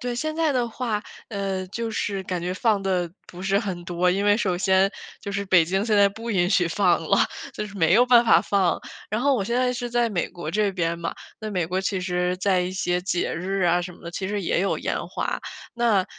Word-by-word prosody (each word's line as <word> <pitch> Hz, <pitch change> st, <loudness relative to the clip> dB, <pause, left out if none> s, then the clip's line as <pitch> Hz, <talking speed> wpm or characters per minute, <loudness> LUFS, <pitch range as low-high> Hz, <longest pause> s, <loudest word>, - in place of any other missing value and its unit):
对， 245 Hz, 0 st, -3 dB
现 310 Hz, +6 st, -2 dB
在 325 Hz, -2 st, +2 dB
的 245 Hz, -3 st, 0 dB
话， 225 Hz, -3 st, -2 dB, 0.3 s
呃， 195 Hz, -3 st, -3 dB
就 230 Hz, +3 st, -4 dB
是 200 Hz, -2 st, -2 dB
感 180 Hz, -1 st, -3 dB
觉 180 Hz, +1 st, -2 dB
放 205 Hz, +1 st, +1 dB
得 180 Hz, -3 st, 0 dB, 0.2 s
不 180 Hz, +1 st, -10 dB
是 195 Hz, +1 st, +2 dB
很 190 Hz, -5 st, -4 dB
多。 175 Hz, +1 st, +1 dB
因 195 Hz, +3 st, 0 dB
为 205 Hz, 0 st, +5 dB
首 190 Hz, -6 st, 0 dB
先 190 Hz, +1 st, +3 dB, 0.3 s
就 200 Hz, -, -6 dB
是 200 Hz, 0 st, -2 dB
北 185 Hz, -3 st, +5 dB
京 190 Hz, +4 st, 0 dB
现 220 Hz, -2 st, +2 dB
在 200 Hz, 0 st, +6 dB
不 225 Hz, +4 st, -6 dB
允 180 Hz, -4 st, +2 dB
许 180 Hz, -3 st, +3 dB
放 180 Hz, -1 st, +2 dB
了， -, -, +3 dB, 0.4 s
就 210 Hz, -, -4 dB
是 205 Hz, 0 st, -11 dB
没 165 Hz, -2 st, +3 dB
有 240 Hz, +4 st, +6 dB
办 240 Hz, -1 st, +6 dB
法 -, -, +6 dB
放。 195 Hz, -3 st, +1 dB, 0.3 s
然 215 Hz, +2 st, -1 dB
后 280 Hz, +2 st, +3 dB
我 230 Hz, -, 0 dB
现 235 Hz, +5 st, -1 dB
在 250 Hz, 0 st, +2 dB
是 245 Hz, -1 st, -4 dB
在 240 Hz, 0 st, +2 dB
美 190 Hz, -6 st, -1 dB
国 170 Hz, -3 st, -6 dB
这 210 Hz, +2 st, +1 dB
边 170 Hz, -3 st, -1 dB
嘛， 170 Hz, 0 st, -4 dB, 0.3 s
那 215 Hz, 0 st, -4 dB
美 180 Hz, -5 st, -1 dB
国 185 Hz, +3 st, -1 dB
其 190 Hz, 0 st, -1 dB
实 180 Hz, 0 st, -1 dB
在 185 Hz, 0 st, +2 dB
一 180 Hz, 0 st, -2 dB
些 180 Hz, -1 st, 0 dB
节 180 Hz, -1 st, -1 dB
日 190 Hz, +3 st, -2 dB
啊 175 Hz, 0 st, +3 dB
什 180 Hz, 0 st, -6 dB
么 -, -, -18 dB
的， 170 Hz, -, -6 dB
其 190 Hz, +2 st, -4 dB
实 205 Hz, 0 st, -2 dB
也 170 Hz, -, +1 dB
有 195 Hz, -, 0 dB
烟 -, -, -2 dB
花， -, -, -2 dB, 0.4 s
那， 230 Hz, -5 st, +2 dB
195 Hz, 265 characters per minute, -24 LUFS, 180-215 Hz, 0.4 s, 在